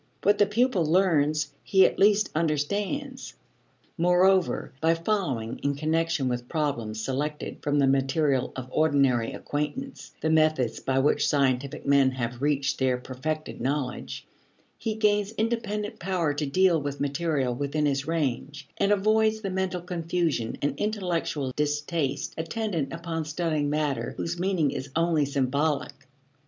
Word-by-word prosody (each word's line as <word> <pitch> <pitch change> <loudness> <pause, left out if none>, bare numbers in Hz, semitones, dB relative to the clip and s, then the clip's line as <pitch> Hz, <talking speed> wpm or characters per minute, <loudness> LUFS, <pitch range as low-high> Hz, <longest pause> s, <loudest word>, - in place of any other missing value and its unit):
What 205 +1 +3
the 205 - +5
pupil 230 -2 +2
learns 155 -3 +2
he 190 -1 +5
at - - 0
least 205 +1 +4
understands. 200 - -2 0.6
Moreover 180 +1 +3
by 165 +1 +3
following, 165 - -2
in 140 0 -1
connection 160 -1 0
with 125 -1 -3
problems 120 -9 -2
selected 150 +3 -3
from 145 0 0
the 140 - +4
material 135 0 +1
of 130 -1 -6
ordinary 140 -7 +2
acquaintance, 190 - -4
the 160 - 0
methods 155 -7 +2
by 135 0 -1
which 140 +3 +3
scientific 140 0 0
men 140 -1 +5
have 125 -1 -4
reached 140 -1 0
their 130 -1 +2
perfected 145 +5 -5
knowledge, 125 - -3 0.5
he 220 -1 -3
gains 210 -1 +1
independent 215 -2 -2
power 175 -5 0
to 145 0 -2
deal 175 +2 +3
with 145 0 -4
material 140 -3 0
within 145 +4 -1
his 140 0 0
range, 145 -3 -2
and 200 - +2
avoids 215 +2 +3
the 195 -3 -3
mental 185 -1 -1
confusion 170 -8 -1
and 145 -1 -1
intellectual 175 -10 -1
distaste 150 -1 -1
attendant 170 -3 -2
upon 165 -1 -3
studying 155 -1 -1
matter 145 -6 -1
whose 170 +1 -3
meaning 180 -6 +1
is 135 - -5
only 165 -3 +2
symbolic. 140 +2 0
155 Hz, 140 wpm, -26 LUFS, 140-180 Hz, 0.6 s, the